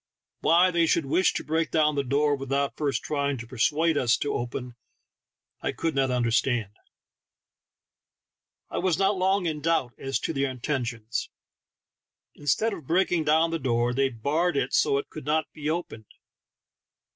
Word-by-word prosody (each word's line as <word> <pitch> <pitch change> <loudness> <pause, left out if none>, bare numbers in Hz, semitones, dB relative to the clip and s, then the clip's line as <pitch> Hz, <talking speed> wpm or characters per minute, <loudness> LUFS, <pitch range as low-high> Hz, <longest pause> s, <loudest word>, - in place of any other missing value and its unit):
Why 180 +3 +4
they 170 -1 +2
should 160 -1 +2
wish 180 +7 +3
to - - -3
break 160 +1 0
down 155 -2 +2
the 140 -1 0
door 145 +3 +2
without 135 +1 -2
first 145 -3 -1
trying 140 -2 -1
to 120 - -7
persuade 150 +6 +1
us 120 -2 +3
to 145 - -2
open 120 +1 -4
it - - -15 0.9
I - - -1
could 165 -1 -2
not 135 -1 +1
understand. 120 -3 +1 2.0
I - - -2
was 180 -4 +1
not 195 +1 +2
long 190 0 +1
in 155 -3 -2
doubt 160 -6 0
as 135 0 -1
to - - -2
their 140 -1 0
intentions, 120 -3 -3 1.0
instead 200 - 0
of 155 -8 -9
breaking 175 -2 +2
down 160 +2 +3
the 165 - -1
door 120 -2 +1
they 135 +1 +2
barred 145 +8 0
it - - -1
so 140 - +3
it 140 - -5
could 155 - -8
not 155 +1 0
be 150 -1 -4
opened. 155 -10 -4
145 Hz, 165 wpm, -26 LUFS, 130-165 Hz, 2.0 s, Why